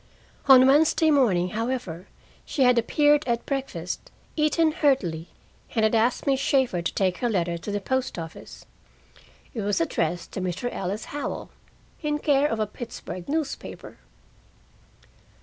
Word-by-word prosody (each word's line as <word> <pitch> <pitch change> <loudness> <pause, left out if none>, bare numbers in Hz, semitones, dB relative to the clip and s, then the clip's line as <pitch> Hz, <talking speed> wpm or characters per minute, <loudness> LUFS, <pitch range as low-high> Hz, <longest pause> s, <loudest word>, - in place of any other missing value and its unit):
On 260 -1 +9
Wednesday 310 +3 +4
morning, 200 -11 +3
however, 220 -6 -4 0.4
she 275 - 0
had 250 -1 +5
appeared 295 +5 +3
at 235 -1 -1
breakfast, 260 - -4 0.3
eaten 315 +1 +2
heartily, 185 - 0 0.5
and 220 - +2
had 220 - +1
asked 230 +2 +2
Miss 270 -2 +2
Shaeffer 265 -9 +1
to 170 - -3
take 185 -2 +1
her 240 - -1
letter 175 -5 0
to 190 - -7
the 205 0 -1
post 260 +3 -2
office. 165 -1 -9 0.9
It 225 - -3
was 205 -1 0
addressed 165 +1 -1
to 190 - -4
Mr. 185 +7 -3
Ellis 195 +3 -3
Howell, 290 - -4 0.5
in 300 -1 0
care 290 -1 +2
of 225 -5 -2
a 215 - +1
Pittsburgh 210 -5 -8
newspaper! 305 -1 -4
235 Hz, 145 wpm, -25 LUFS, 185-275 Hz, 0.9 s, On